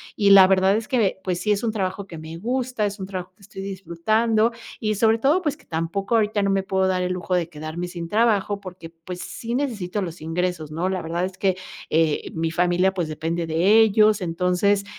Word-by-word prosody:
Y 200 -1 +3
la 190 -1 +9
verdad 190 +1 +3
es 220 -1 -4
que, 220 -7 +1
pues 180 -2 -1
sí, 210 - +1
es 205 0 +1
un 230 - +1
trabajo 190 -1 -3
que 165 -3 -9
me 160 +1 -8
gusta, 245 +1 -1
es 200 0 -4
un 190 - -4
trabajo 185 -1 -6
que - - -28
estoy 195 0 -10
disfrutando 215 +5 0 0.3
y 215 -1 -1
sobre 220 +2 +3
todo, 295 +10 +3
pues 295 -3 -2
que 305 - -23
tampoco 170 +7 -2
ahorita 210 -2 +2
no 200 - +1
me 195 0 +1
puedo 190 0 +1
dar 185 -1 0
el 180 - -1
lujo 180 0 -2
de 170 -2 0
quedarme 155 +3 -5
sin 170 -2 -6
trabajo. 210 -2 +2
Porque, 180 -3 -9
pues, 165 +2 -9
sí 235 +1 -5
necesito 210 -8 -2
los 170 -4 -6
ingresos, 165 -1 -2
¿no?, 170 +4 -1
la 190 -1 -2
verdad 170 +2 -2
es 190 0 -7
que, 190 -2 +1 0.3
eh, 160 -1 +1
mi 160 0 -1
familia 180 +3 +2
pues 175 -4 -2
depende 165 +2 -2
de 190 +8 +4
ellos. 215 0 +4
Entonces, 180 +3 +1
190 Hz, 220 wpm, -23 LUFS, 175-210 Hz, 0.3 s, la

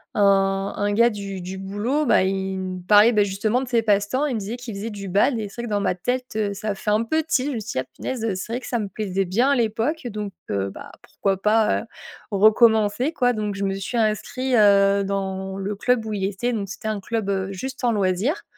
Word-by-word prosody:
un 195 -1 +2
un 205 0 0
gars 235 +3 +5
du 200 -2 -6
du 185 +2 -6
boulot, 210 +10 -1
bah, 230 - +4
il 190 0 -2
me 185 -1 -5
parlait, 210 +5 +6
bah, 210 -1 +4
justement 210 +5 0
de 255 - -5
ses 235 -3 +3
passe-temps, 210 +7 +1
il 255 - -2
me - - -1
disait 220 +5 -5
qu'il 240 -4 -7
faisait 215 +3 -4
du 200 -1 -7
badminton 225 +6 +2
et 210 - -3
c'est 235 - -7
vrai - - -4
que - - -7
dans 205 - +2
ma 185 - 0
tête, 250 +7 -2
heu, 205 -2 0
ça 205 0 -3
fait 210 - -2
un 215 +2 +2
peu 315 +6 +1
tilt, 285 -3 0
je - - -3
me - - -2
suis 225 - -6
dit: - - -1
«Ah 130 - -3
punaise, 245 -4 -4
heu, 200 -4 -1
c'est 185 +5 -6
vrai 245 - -1
que - - -9
ça 240 - -1
me 205 -2 -3
plaisait 195 -1 -2
bien 240 +10 +2
à - - +4
l'époque 235 +6 -1
donc, 210 -3 -5 0.2
heu, 100 0 -1
bah, - - -10
pourquoi 195 -1 -2
pas, 215 0 +3
heu, - - -13 0.5
recommencer 220 +5 +4
quoi?». 245 -4 +2
Donc 210 -2 -3
je 200 - -3
me 195 0 -1
suis 195 +5 -5
inscrit, 240 +4 0
heu, 200 -1 +5
dans 190 -1 -3
le 200 +1 -3
club 245 0 +1
où 220 - -4
il 195 -2 -1
était. 205 +5 -1
Donc 200 -3 -2
c'était 220 - -5
un 210 -2 -2
club, 220 -2 -2
heu, 190 -1 -1
juste 265 +7 -6
en 235 - +3
loisir. 200 - 0
210 Hz, 255 wpm, -23 LUFS, 195-235 Hz, 0.5 s, parlait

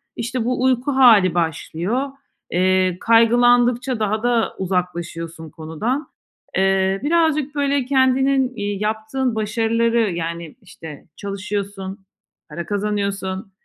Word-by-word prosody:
İşte, 235 0 -3
bu 250 +1 -1
uyku 260 +2 +1
hâli 220 -9 +6
başlıyor. 175 - -2 0.4
Eee, 185 0 +2
kaygılandıkça 240 +1 +3
daha 215 +1 -1
da 240 -2 +1
uzaklaşıyorsun 170 -3 -3
konudan. 185 - -3 0.5
Eee, 190 0 +2
birazcık, 305 -2 +1
böyle, 280 -2 +1
kendinin, 265 0 +2
iii, 205 -1 -3
yaptığın 220 +4 -2
başarıları, 225 0 +1
yani, 170 -1 -5
işte, 155 -3 -11
çalışıyorsun, 200 -1 -5 0.4
para 170 - -6
kazanıyorsun, 200 -1 -3
215 Hz, 100 wpm, -20 LUFS, 185-245 Hz, 0.5 s, hâli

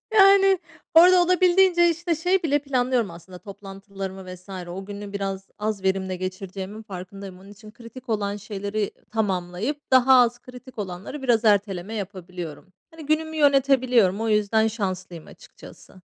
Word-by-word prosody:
Yani 390 -2 +6 0.4
orada 355 +2 +7
olabildiğince, 360 0 +4
işte, 335 +1 -2
şey 360 +4 0
bile 290 -2 +2
planlıyorum, 255 -5 0
aslında, 170 +2 -12
toplantılarımı 195 -1 -9
vs. 180 +2 -18 0.2
O 190 +2 -7
günü 205 0 -8
biraz 195 -1 -4
az 210 -2 -3
verimle 190 -1 -1
geçireceğimin 190 +3 -6
farkındayım. 195 -1 -9
Onun 195 - -15
için 215 +1 -14
kritik 240 +3 -13
olan 205 -2 -1
şeyleri, 205 +1 -5
iii, 200 - -2 0.2
tamamlayıp 210 +6 -3
daha 260 +1 +6
az 240 0 +2
kritik 250 0 -14
olanları 195 +8 -6
biraz 240 -3 +2
erteleme 200 -1 +1
yapabiliyorum. 180 -4 -7 0.2
Hani, 320 -3 -12
günümü 315 +1 -1
yönetebiliyorum, 255 -8 +3
o 225 - -1
yüzden 220 +1 +2
şanslıyım 185 -6 -5
açıkçası. - - -15
210 Hz, 140 wpm, -24 LUFS, 195-270 Hz, 0.4 s, orada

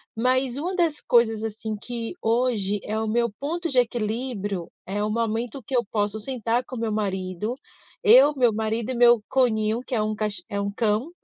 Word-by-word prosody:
Mas 255 +2 +1
uma 355 +6 -2
das 330 -5 +1
coisas, 225 -2 +3
assim, 220 0 -4
que 230 +1 -5
hoje 225 -4 +1
é 215 - -3
o 220 - -2
meu 235 +2 +1
ponto 335 +4 -2
de 260 - -2
equilíbrio 220 -5 -2 0.2
é 205 +2 -2
o 210 - 0
momento 230 +3 -2
que 260 - -3
eu 240 - +1
posso 205 0 0
sentar 240 0 -1
com 255 - -8
o - - -5
meu 225 -1 -1
marido, 195 0 -2 0.5
eu, 445 -8 +7
meu 245 -3 +4
marido 220 +2 -2
e - - -3
meu 240 -1 +6
conínho, 225 -3 +2
que - - -6
é 220 - +1
um 215 0 -1
ca 215 0 0 0.2
é 200 - -2
um 200 0 -2
cão. 215 +6 0
230 Hz, 200 wpm, -25 LUFS, 215-250 Hz, 0.5 s, eu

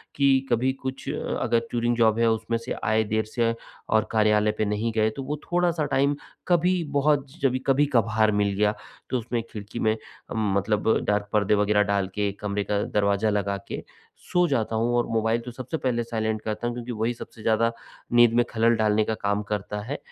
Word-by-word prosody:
कि 135 -1 +3
कभी 125 +2 +2
कुछ 130 0 -5
अगर 115 - 0
टूरिंग 120 0 +1
जॉब 115 -1 +3
है, 115 -1 +4
उसमें 110 +1 0
से 115 +2 -5
आए 110 +1 +2
देर 110 +1 -1
से 115 +1 0 0.4
और 110 -1 +2
कार्यालय 105 -1 +3
पे 110 - +1
नहीं 105 +3 -1
गए, 110 -1 +3
तो 130 +5 -6
वो 150 +2 -3
थोड़ा-सा 175 -3 +2
टाइम 140 +2 +2 0.3
कभी 180 0 +2
बहुत 140 -1 +2
जभी 130 -2 +2
कभी-कभार 115 -6 +3
मिल 100 -1 +1
गया, 105 +1 +2 0.4
तो 130 - +1
उसमे 115 0 -2
खिड़की 105 +2 -7
में 110 0 +1 0.4
मतलब 105 +1 +1
डार्क 105 0 0
पर्दे 105 0 +3
वग़ैरह 105 0 +3
डाल 100 -1 0
के, 105 -1 0
कमरे 105 0 -2
का 105 0 -1
दरवाज़ा 100 +1 +1
लगा 100 -1 0
के, - - -5 0.3
सो 180 0 +1
जाता 115 -6 0
हूँ 115 +2 +1
और 120 - +2
मोबाइल 115 +1 +1
तो 125 - -6
सबसे 130 +6 -5
पहले 120 -5 0
साइलेंट 110 -2 -2
करता 110 +2 -3
हूँ, 120 - -3
क्योंकि 120 0 -5
वही 115 +1 -1
सबसे 115 -1 -11
ज़्यादा, 115 +1 +2 0.4
नींद 120 -1 +6
में 120 +1 +4
ख़लल 115 +1 +3
डालने 110 -1 +2
का 110 - -1
काम 100 0 -1
करता 105 0 -3
है। 135 +6 -4
110 Hz, 195 wpm, -25 LUFS, 105-120 Hz, 0.4 s, नींद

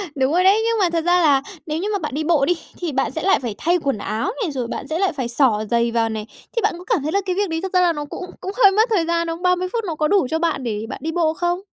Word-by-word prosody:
Đúng 265 +1 +1
rồi 360 +2 +3
đấy, 400 +3 +5
nhưng 460 0 +1
mà 365 -3 +3
thật 335 -1 -1
ra 355 0 +4
là 285 -4 +4 0.2
nếu 310 -1 -3
như 410 +4 -2
mà 400 - 0
bạn 305 -4 -4
đi 310 - -1
bộ 305 -4 +3
đi 355 - +3 0.3
thì 345 -3 -2
bạn 270 -1 0
sẽ 320 - -4
lại 390 +1 +4
phải 235 -5 -4
thay 345 +3 +2
quần 275 -5 0
áo 220 - -2
này, 360 -9 -1
rồi 250 -4 -3
bạn 275 - -5
sẽ 320 +2 -2
lại 385 -3 +1
phải 260 -5 -3
xỏ 235 -3 +2
giày 235 0 +2
vào 230 -1 +1
này, 215 -1 -5 0.3
thì 465 - +1
bạn - - +1
có 355 - -10
cảm 400 - 0
thấy 310 - -2
là 400 +3 +1
cái 365 -1 -1
việc 405 -2 0
đấy 325 0 -2
thật 380 0 -5
ra 365 - +4
là 345 -2 +3
nó 295 -1 -5
cũng 360 - -7 0.2
cũng 385 - -4
hơi 395 - +8
mất 440 +4 +3
thời 385 -7 +2
gian 335 0 0
không? 330 +1 -4
30 360 0 +2
phút 460 - -1
nó 325 - -3
có 305 0 +1
đủ 390 -7 +3
cho 320 - 0
bạn 325 -5 -1
để 220 -2 -3
bạn - - -6
đi 320 - -1
bộ 325 -2 +1
không? 350 +2 -1
330 Hz, 335 wpm, -21 LUFS, 275-365 Hz, 0.3 s, hơi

